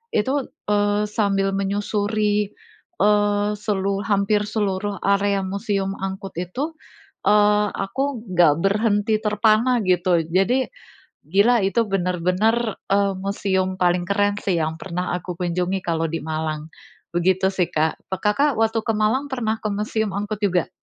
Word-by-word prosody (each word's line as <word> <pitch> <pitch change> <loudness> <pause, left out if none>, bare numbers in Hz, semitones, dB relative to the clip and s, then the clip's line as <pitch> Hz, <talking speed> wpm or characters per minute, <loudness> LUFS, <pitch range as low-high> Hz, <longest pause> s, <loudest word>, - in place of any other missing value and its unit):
itu, 265 +5 +1 0.3
eee, 205 0 +2
sambil 195 -2 +1
menyusuri, 205 +1 0 0.5
eee, 205 0 +3
selu 200 -1 -1
hampir 205 0 +2
seluruh 205 -1 -1
area 200 0 +2
Museum 195 0 -2
Angkut 195 -1 -5
itu, 250 - -3 0.6
eee, 210 0 +4
aku 245 +5 -2
enggak 170 -4 +5
berhenti 205 +1 +2
terpana 215 +3 +2
gitu. 180 -2 +2
Jadi 195 +10 +2 0.6
gila, 205 +7 +3
itu 230 +4 +1
benar-benar, 195 +5 0 0.2
eee, 200 0 +3
museum 190 -1 -1
paling 175 0 +2
keren 205 0 +2
sih 180 -4 +1
yang 160 0 -1
pernah 180 -1 -3
aku 180 0 -5
kunjungi 180 +2 -1
kalau 165 -1 0
di 165 - -2
Malang. 155 -1 -3 0.5
Begitu 190 +2 +2
sih, 180 -2 +1
Kak. 155 +1 0
Pe 190 - -1
Kakak 270 +7 +2
waktu 225 0 +2
ke 225 - +1
Malang 220 +7 +1
pernah 225 -4 -1
ke 215 - 0
Museum 215 0 -1
Angkut 205 +1 -3
juga? 180 -4 +1
200 Hz, 135 wpm, -22 LUFS, 185-210 Hz, 0.6 s, enggak